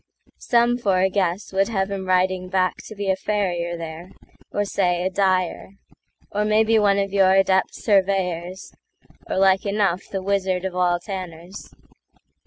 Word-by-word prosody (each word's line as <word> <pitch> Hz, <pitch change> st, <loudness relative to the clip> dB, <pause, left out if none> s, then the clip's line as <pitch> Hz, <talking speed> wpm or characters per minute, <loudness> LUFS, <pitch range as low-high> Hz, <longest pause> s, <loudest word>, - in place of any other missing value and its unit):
Some, 240 Hz, 0 st, +2 dB
for 195 Hz, -5 st, +1 dB
a 190 Hz, +1 st, +2 dB
guess, 185 Hz, 0 st, -1 dB
would 195 Hz, +1 st, +2 dB
have 195 Hz, -3 st, -2 dB
him 190 Hz, -1 st, -4 dB
riding 185 Hz, 0 st, +1 dB
backTo 190 Hz, +3 st, -2 dB
be 200 Hz, -1 st, 0 dB
a -, -, +1 dB
farrier 180 Hz, -4 st, -2 dB
there, 165 Hz, +2 st, -8 dB, 0.4 s
or 205 Hz, -, -1 dB
say 180 Hz, -3 st, 0 dB
a 190 Hz, -, 0 dB
dyer; 185 Hz, -1 st, 0 dB, 0.6 s
Or 210 Hz, +1 st, 0 dB
maybe 220 Hz, +1 st, +3 dB
one 200 Hz, -1 st, +3 dB
of 195 Hz, -1 st, -1 dB
your 190 Hz, -1 st, +4 dB
adept 190 Hz, -1 st, +2 dB
surveyors; 190 Hz, -3 st, -1 dB, 0.6 s
Or -, -, -2 dB
like 190 Hz, 0 st, +4 dB
enough 200 Hz, -3 st, 0 dB
the 195 Hz, -1 st, -4 dB
wizard 190 Hz, -2 st, -1 dB
of 185 Hz, -1 st, -4 dB
all 175 Hz, -1 st, +1 dB
tanners. 180 Hz, -1 st, -8 dB
190 Hz, 155 wpm, -22 LUFS, 180-200 Hz, 0.6 s, your